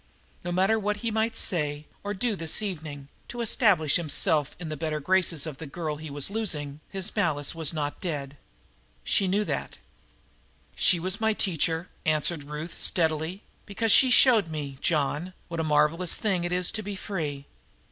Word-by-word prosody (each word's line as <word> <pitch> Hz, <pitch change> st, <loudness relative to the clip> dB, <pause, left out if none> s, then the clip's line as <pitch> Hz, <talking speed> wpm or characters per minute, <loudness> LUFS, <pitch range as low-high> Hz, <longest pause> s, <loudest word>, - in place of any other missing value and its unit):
No 175 Hz, -, -3 dB
matter 190 Hz, +5 st, +2 dB
what 210 Hz, 0 st, -1 dB
he 230 Hz, -, 0 dB
might 220 Hz, +1 st, 0 dB
say 150 Hz, -5 st, +1 dB, 0.2 s
or 205 Hz, +1 st, -3 dB
do 220 Hz, +2 st, 0 dB
this 165 Hz, +4 st, 0 dB
evening 155 Hz, -8 st, -5 dB, 0.2 s
to 240 Hz, -, -8 dB
establish 200 Hz, -, +3 dB
himself 155 Hz, -2 st, +2 dB
in 170 Hz, -3 st, -6 dB
the 155 Hz, -, -3 dB
better 155 Hz, 0 st, -2 dB
graces 170 Hz, -1 st, +1 dB
of 150 Hz, -4 st, -7 dB
the 160 Hz, -, -7 dB
girl 155 Hz, 0 st, -4 dB
he 155 Hz, 0 st, -8 dB
was 145 Hz, +5 st, -2 dB
losing, 150 Hz, -10 st, -1 dB
his 195 Hz, +1 st, -3 dB
malice 155 Hz, -8 st, +1 dB
was 165 Hz, -3 st, 0 dB
not 150 Hz, -3 st, -4 dB
dead. 145 Hz, -6 st, -3 dB
That 145 Hz, -, -20 dB, 0.7 s
she 195 Hz, -, +2 dB
knew. 205 Hz, +3 st, +1 dB, 1.3 s
"She 175 Hz, -, +3 dB
was 185 Hz, +5 st, -1 dB
my 220 Hz, 0 st, +3 dB
teacher," 170 Hz, -3 st, 0 dB, 0.2 s
answered 155 Hz, 0 st, 0 dB
Ruth 150 Hz, +3 st, -7 dB
steadily, 160 Hz, +2 st, +1 dB, 0.2 s
"because 215 Hz, +2 st, 0 dB
she 260 Hz, -, +7 dB
showed 245 Hz, -6 st, +6 dB
me, 145 Hz, -4 st, -6 dB
John, 155 Hz, +3 st, 0 dB, 0.2 s
what 170 Hz, -1 st, -4 dB
a -, -, +1 dB
marvelous 155 Hz, +3 st, +2 dB
thing 190 Hz, -5 st, 0 dB
it 175 Hz, -, -3 dB
is 180 Hz, 0 st, +2 dB
to 215 Hz, -, -1 dB
be 205 Hz, -1 st, -5 dB
free. 150 Hz, -8 st, -4 dB
170 Hz, 175 wpm, -27 LUFS, 150-200 Hz, 1.3 s, she